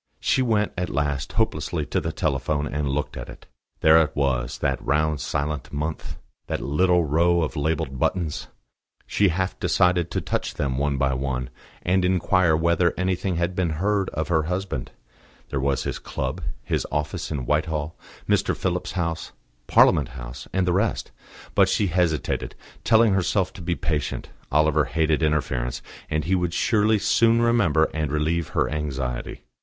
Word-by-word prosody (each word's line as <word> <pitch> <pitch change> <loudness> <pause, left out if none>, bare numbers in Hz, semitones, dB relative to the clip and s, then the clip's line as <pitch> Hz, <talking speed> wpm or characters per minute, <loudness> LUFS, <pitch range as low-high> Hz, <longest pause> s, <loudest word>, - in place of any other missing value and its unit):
She - - +2
went 110 -4 +1
at 90 - -2
last, 70 -1 -2
hopelessly, - - -1
to - - -1
the 80 - -2
telephone, 75 -2 -1
and 75 -1 -2
looked 70 +2 -2
at - - -7
it. - - -12 0.4
There 80 +1 +7
it 75 - -1
was, 65 -4 0
that 65 -2 -1
round 75 +1 +1
silent 75 0 -3
mouth, 75 +2 -4 0.3
that - - -2
little 90 +5 +2
row 85 +3 +3
of 80 - -3
labelled 75 -3 -1
buttons. 80 0 -1 0.6
She 105 - +2
half 95 +2 -1
decided 90 -1 +2
to - - -1
touch - - -3
them 65 -2 -1
one 70 -1 0
by 65 0 +1
one, 65 -1 -3 0.3
and 90 +1 +2
inquire 90 -2 +3
whether 85 +1 +2
anything 90 0 0
had 85 +2 0
been 90 -4 0
heard 100 +2 +1
of 80 +2 -3
her 80 -2 +3
husband: 90 -8 -3 0.6
there 70 - -2
was 70 0 0
his - - -3
club, - - -4 0.2
his - - -1
office 75 0 -2
in 70 -5 -3
Whitehall, 75 +2 -1 0.3
Mr. - - +1
Phillips's 90 -1 -2
house, 85 -3 -3 0.3
Parliament 70 - +5
house, - - -8
and 95 -1 0
the 90 - +2
rest. 100 +4 0 0.4
But - - +4
she 105 - +2
hesitated, 85 -5 0 0.3
telling 110 -2 +5
herself 95 0 +1
to 100 - -10
be 85 +1 -1
patient. 75 -3 -2 0.2
Oliver 75 0 +3
hated 80 +4 +1
interference, 70 -6 -1 0.3
and 75 -1 -1
he 95 - 0
would 90 -2 0
surely 110 -1 +3
soon 115 +3 +3
remember 105 -10 +3
and 75 -2 -2
relieve 80 +2 0
her - - +3
anxiety. 70 -4 -4
80 Hz, 165 wpm, -24 LUFS, 75-90 Hz, 0.6 s, There